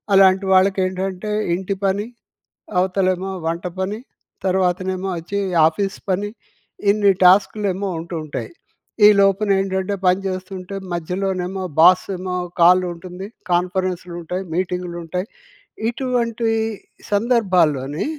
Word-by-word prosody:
అలాంటి 190 0 +5
వాళ్ళకేంటంటే 190 +1 +1 0.2
ఇంటి 190 +2 -3
పని, 200 +2 0 0.7
అవతలేమో 185 0 0 0.2
వంట 170 +2 -3
పని, 200 +4 -2 0.5
తర్వాతనేమో 185 0 0
వచ్చి 200 +5 -4 0.3
ఆఫీస్ 195 +4 -2
పని, 200 +3 -1 0.6
ఇన్ని 205 -1 +4
టాస్క్‌లేమో 195 +1 +3
ఉంటుంటాయి. 165 - -5 0.6
ఈలోపునేంటంటే 195 -1 +2
పని 180 +1 +4
చేస్తుంటే, 185 0 -6 0.2
మధ్యలోనేమో 185 +2 -2 0.2
బాసేమో 185 +1 +4 0.3
కాలుంటుంది. 180 +1 +2 0.2
కాన్ఫరెన్స్‌లుంటాయి, 180 0 -2
మీటింగ్‌లుంటాయి. 180 0 -3 0.6
ఇటువంటి 235 -2 -1 0.6
సందర్భాల్లోని, 180 - +2
185 Hz, 80 wpm, -20 LUFS, 180-195 Hz, 0.7 s, అలాంటి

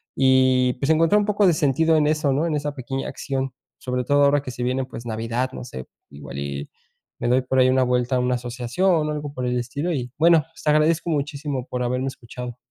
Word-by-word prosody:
y, 130 -1 +4
pues, 135 +3 -2
encontrar 165 +6 +4
un 205 - 0
poco 205 -1 +2
de 180 - +5
sentido 155 +2 +2
en 150 -1 +3
eso, 155 -2 +1
¿no?, 145 +5 +1
en 160 -3 0
esa 145 0 -2
pequeña 135 0 -4
acción, 135 -1 -3 0.3
sobre 125 -1 -2
todo 145 0 +3
ahora 140 0 +4
que 130 - -7
se 120 0 -5
viene, 130 +1 0
pues, 120 -2 -9
navidad, 115 +3 -2
no 125 - -8
sé, 65 - -8 0.2
igual 70 -1 -9
y 70 0 -5 0.5
me - - -2
doy 125 +2 +3
por 130 +1 0
ahí 130 - +6
una 130 0 +3
vuelta 125 0 +1
a 125 - +2
una 125 0 +1
asociación 130 +8 0
o - - -1
algo 145 -1 -5
por 125 -2 -4
el 125 0 0
estilo 140 +8 -3
y, 125 -5 -3
bueno, 165 -1 +5 0.2
te 150 - +1
agradezco 155 +3 +2
muchísimo 145 -3 -2
por 125 0 -2
haberme 125 +2 -1
escuchado. 125 -1 -7
130 Hz, 225 wpm, -23 LUFS, 125-150 Hz, 0.5 s, ahí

